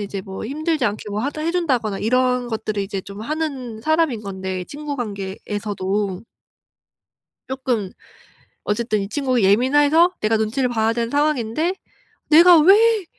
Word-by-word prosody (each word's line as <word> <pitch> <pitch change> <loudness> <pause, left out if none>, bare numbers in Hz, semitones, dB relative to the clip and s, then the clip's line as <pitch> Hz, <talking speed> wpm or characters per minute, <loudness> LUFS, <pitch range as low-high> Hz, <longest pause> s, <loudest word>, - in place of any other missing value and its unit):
이제 200 -1 -5
뭐 190 +2 -8
힘들지 310 +2 -1
않게 210 -1 -2
뭐 205 +1 -2
하다 285 +5 -3
해 325 - 0
준다거나 255 - 0
이런 250 +2 +1
것들을 220 -2 -3
이제 195 0 -4
좀 200 +2 -10
하는 270 -5 -4
사람인 315 -4 +1
건데 190 -2 -5
친구 290 +6 -6
관계에서도. 200 -2 -3 1.3
쪼끔 255 -7 -2 0.7
어쨌든 215 0 -1
이 195 - -5
친구가 255 -1 0
예민해서 290 - +4
내가 220 +1 +2
눈치를 225 +4 0
봐야 225 -1 +1
되는 230 0 -2
상황인데 290 +2 0 0.6
내가 335 +2 +8
왜 415 +5 +5
235 Hz, 305 characters per minute, -21 LUFS, 205-295 Hz, 1.3 s, 내가